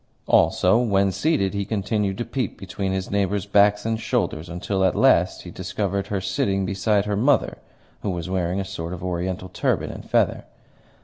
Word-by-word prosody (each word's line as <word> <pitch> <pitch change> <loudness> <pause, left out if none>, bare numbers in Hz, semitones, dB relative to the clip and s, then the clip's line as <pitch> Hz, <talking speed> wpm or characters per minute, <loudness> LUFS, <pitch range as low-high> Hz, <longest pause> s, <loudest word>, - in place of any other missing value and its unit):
Also, 95 +5 +4
when 100 -5 +2
seated, 105 - +1
he 100 0 -1
continued 100 -1 -1
to 120 - -3
peep 130 -7 -3
between 95 0 -4
his 95 0 -3
neighbours' 100 0 0
backs 100 +1 +3
and 115 -1 -1
shoulders, 80 -6 -1
until 95 +3 -2
at 95 - +2
last - - +3
he - - -9
discovered 95 +1 -3
her 100 -1 -1
sitting 95 +1 0
beside 100 +2 +1
her 105 -1 -1
mother, 130 +7 +2 0.4
who - - -2
was 85 -3 -3
wearing 90 0 -1
a 95 - -2
sort 90 -3 -5
of 90 - -7
Oriental 90 +1 -3
turban - - -1
and - - -10
feather. - - +1
95 Hz, 180 wpm, -23 LUFS, 95-105 Hz, 0.4 s, Also